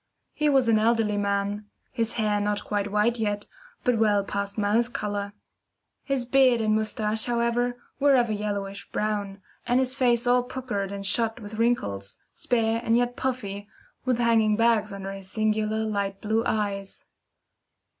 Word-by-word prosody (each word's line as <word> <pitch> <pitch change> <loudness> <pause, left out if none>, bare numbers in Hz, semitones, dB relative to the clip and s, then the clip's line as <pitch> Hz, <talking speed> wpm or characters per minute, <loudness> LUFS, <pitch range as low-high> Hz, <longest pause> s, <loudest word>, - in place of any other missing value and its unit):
He 300 -1 +1
was 270 -4 +3
an 220 -1 +4
elderly 225 -1 +2
man 200 +1 -1 0.2
his 230 -3 0
hair 210 -2 0
not 205 0 -1
quite 205 -1 -2
white 220 +3 +2
yet, 205 -1 -1 0.4
but 245 -3 +2
well 205 -2 +3
past 200 +1 -3
mouse 215 +3 +2
colour. 205 -3 -3 0.7
His 275 -3 -2
beard 255 -1 +4
and 215 -1 +1
moustache, 215 0 0
however, 240 +1 0 0.2
were 280 -1 +5
of 245 -2 +3
a 220 - -1
yellowish 200 -1 -4
brown, 205 -2 -2 0.2
and 245 +1 +3
his 260 -1 +2
face 245 -3 +2
all 245 0 +4
puckered 245 -6 -4
and 200 0 -5
shot 225 +4 +1
with 210 -1 -9
wrinkles, 100 - 0 0.2
spare 230 -1 0
and 230 0 +3
yet 245 0 0
puffy, 210 -7 -3 0.4
with 255 -2 +1
hanging 225 -3 +3
bags 225 -2 +2
under 195 0 -6
his 195 -1 -7
singular 215 0 0
light 200 -2 -2
blue 220 +1 0
eyes. 200 -2 -3
215 Hz, 160 wpm, -26 LUFS, 205-240 Hz, 0.7 s, were